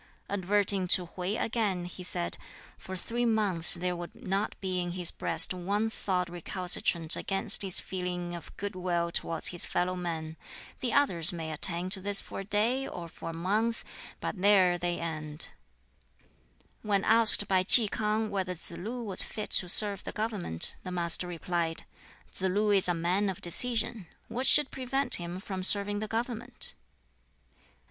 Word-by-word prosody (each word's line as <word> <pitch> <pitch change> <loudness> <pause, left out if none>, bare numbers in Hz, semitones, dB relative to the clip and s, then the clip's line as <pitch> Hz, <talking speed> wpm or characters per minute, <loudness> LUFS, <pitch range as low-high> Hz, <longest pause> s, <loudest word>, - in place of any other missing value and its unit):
Adverting 200 -1 +1
to 180 0 +5
Hwķi 180 +5 -5
again, 205 -6 -2
he 180 +1 -10
said, 85 - -3 0.4
"For 190 - -9
three 235 +6 -3
months 205 -8 +3
there 180 +1 -3
would 175 0 -9
not 195 +3 -4
be 185 -2 -3
in 175 -1 -5
his 180 -2 -1
breast - - +2
one 200 +5 -2
thought 180 -4 -3
recalcitrant 175 -1 +1
against 195 0 0
his 190 -3 +1
feeling 180 -1 -5
of 170 - -11
good 205 0 -5
will 175 -2 -2
towards 165 -1 +2
his 175 - 0
fellow 180 +1 -2
men. 160 -3 -6 0.4
The 250 - -2
others 180 - +3
may 165 -2 -6
attain 175 +3 -2
to 190 - -4
this 200 +1 -2
for - - -8
a - - -5
day 225 +7 0
or 170 -1 -8
for 165 - -10
a - - -6
month, 210 +7 -2 0.4
but 185 - -6
there 185 -3 +3
they 175 0 -3
end." 155 -2 -6 1.3
When 200 -2 -1
asked 220 -2 +7
by 190 -1 +1
Ki 220 +3 +9
K'ang 215 +1 -2
whether 185 -2 -3
Tsz 170 - -1
lu 225 +8 -7
was 195 -4 -5
fit 215 - -5
to 180 - +5
serve 200 0 +5
the - - -6
government, 210 - -2
the 185 - -8
Master 175 0 0
replied, 170 -1 -4 0.5
"Tsz - - -6
lu 205 +3 0
is 195 -2 +2
a 175 - 0
man 180 +5 -1
of 190 - -6
decision: 225 +1 +3 0.2
what 255 +3 -2
should 295 -2 +4
prevent 270 +1 0
him 175 +1 -7
from 190 -1 -7
serving 205 +2 +4
the 215 - -5
government?" 230 +1 -3
185 Hz, 170 wpm, -28 LUFS, 175-210 Hz, 1.3 s, Ki